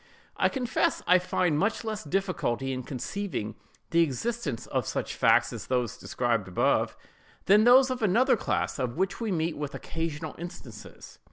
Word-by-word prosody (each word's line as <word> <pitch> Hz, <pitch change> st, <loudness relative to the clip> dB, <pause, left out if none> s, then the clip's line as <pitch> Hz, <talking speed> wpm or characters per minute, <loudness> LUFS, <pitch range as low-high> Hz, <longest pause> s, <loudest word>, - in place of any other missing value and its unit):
I -, -, +2 dB
confess 250 Hz, -4 st, 0 dB
I 180 Hz, +1 st, +6 dB
find 175 Hz, -3 st, 0 dB
much 210 Hz, +6 st, 0 dB
less 215 Hz, -1 st, -4 dB
difficulty 155 Hz, -, -1 dB
in 130 Hz, -, -3 dB
conceiving 130 Hz, -, -4 dB, 0.4 s
the 170 Hz, -, +4 dB
existence 160 Hz, -, -2 dB
of -, -, -2 dB
such -, -, -3 dB
facts -, -, +3 dB
as -, -, -7 dB
those 125 Hz, -4 st, 0 dB
above -, -, -15 dB
described, 115 Hz, -7 st, 0 dB, 0.5 s
than 210 Hz, +3 st, +5 dB
those 255 Hz, +2 st, +7 dB
of 255 Hz, -1 st, -3 dB
another 225 Hz, +6 st, +4 dB
class, 205 Hz, -, -2 dB
of 125 Hz, 0 st, -2 dB
which 190 Hz, +5 st, -1 dB
we 225 Hz, -3 st, -1 dB
meet 165 Hz, -2 st, -1 dB
with 145 Hz, -1 st, -5 dB
occasional 160 Hz, -2 st, -4 dB
instances. 130 Hz, -10 st, -10 dB
170 Hz, 160 wpm, -28 LUFS, 130-210 Hz, 0.5 s, those